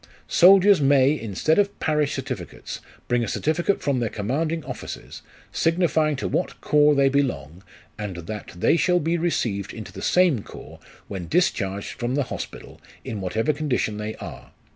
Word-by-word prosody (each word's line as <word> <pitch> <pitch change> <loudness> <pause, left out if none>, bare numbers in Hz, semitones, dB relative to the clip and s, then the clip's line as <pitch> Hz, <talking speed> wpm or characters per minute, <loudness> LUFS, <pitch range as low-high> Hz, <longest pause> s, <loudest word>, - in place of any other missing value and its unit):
Soldiers 195 0 +6
may, 135 -1 +5
instead 130 - 0
of 200 0 0
parish 150 -2 0
certificates, - - -6 0.3
bring 120 -1 +1
a - - -2
certificate 165 - 0
from 140 -3 +1
their 115 -2 -1
commanding 155 +11 -2
officers, - - -8 0.3
signifying 165 -3 +1
to 135 - -3
what - - -2
corps 150 0 +4
they 140 -1 +4
belong, 130 - -1 0.4
and 105 -3 -4
that 105 +2 -6
they 90 - +3
shall 180 +1 +3
be 165 +1 0
received 115 - -1
into 110 -3 -8
the - - -8
same 180 - +3
corps, - - -12 0.3
when 95 -4 -6
discharged 100 - 0
from 120 +2 -1
the 145 - +1
Hospital - - -8 0.2
in 105 -3 -4
whatever 110 +10 0
condition 135 -8 -1
they 105 +1 -4
are. - - -9
140 Hz, 160 wpm, -24 LUFS, 110-160 Hz, 0.4 s, Soldiers